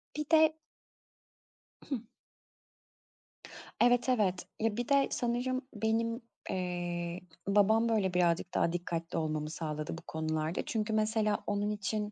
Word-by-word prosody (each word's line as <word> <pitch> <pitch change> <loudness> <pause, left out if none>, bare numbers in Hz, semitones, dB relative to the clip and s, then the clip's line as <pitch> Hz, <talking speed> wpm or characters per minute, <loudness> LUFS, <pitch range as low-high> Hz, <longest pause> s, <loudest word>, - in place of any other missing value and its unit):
Bir 300 +1 -2
de 315 -1 +6 1.4
Hıh. 265 -6 -1 1.8
Evet, 245 +1 +4
evet, 200 -7 +2
ya 220 -1 0
bir 240 -1 -2
de 280 -1 +5
sanırım 250 +1 0
benim, 230 +2 0 0.3
eee, 175 -1 -2 0.3
babam 215 +3 +4
böyle 200 -5 +1
birazcık 175 0 +2
daha 170 - +2
dikkatli 170 -1 -3
olmamı 155 -1 -1
sağladı 155 0 -4
bu - - -9
konularda. 160 +1 -1
Çünkü, 220 -1 -1
mesela, 215 -1 +1
onun 205 0 0
için 210 0 -2
205 Hz, 120 wpm, -32 LUFS, 175-230 Hz, 1.8 s, de